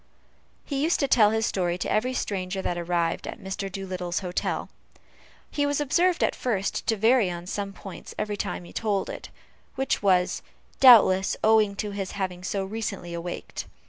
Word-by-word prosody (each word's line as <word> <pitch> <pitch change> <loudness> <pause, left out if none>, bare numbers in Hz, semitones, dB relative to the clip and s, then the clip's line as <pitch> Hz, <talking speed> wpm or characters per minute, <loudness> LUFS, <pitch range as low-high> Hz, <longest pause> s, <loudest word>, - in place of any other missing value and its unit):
He 275 -2 -2
used 325 +4 +2
to 280 - +2
tell 220 -5 +5
his 220 +1 +1
story 175 -4 0
to - - -3
every 250 +4 +1
stranger 190 -3 -2
that 175 - -1
arrived 170 -1 -1
at - - -6
Mr. 195 0 -5
Doolittle's 185 -2 -3
hotel. 180 -1 -3 0.8
He 290 - 0
was 285 0 +1
observed, 340 +5 +2
at - - +2
first, 200 -6 -2
to 225 - +2
vary 225 -1 +4
on 175 0 -6
some 200 +2 -3
points 195 0 -10
every 210 -1 -2
time 200 - -4
he 175 - -13
told 205 -3 -1
it, - - -8 0.5
which 270 0 0
was, 185 -3 +2 0.4
doubtless, 210 -7 +7
owing 215 -2 +4
to 205 +1 -3
his 195 -2 -4
having 185 -2 -4
so 195 +1 -2
recently 200 -4 -4
awaked. 170 +1 -6
200 Hz, 175 wpm, -26 LUFS, 185-225 Hz, 0.8 s, doubtless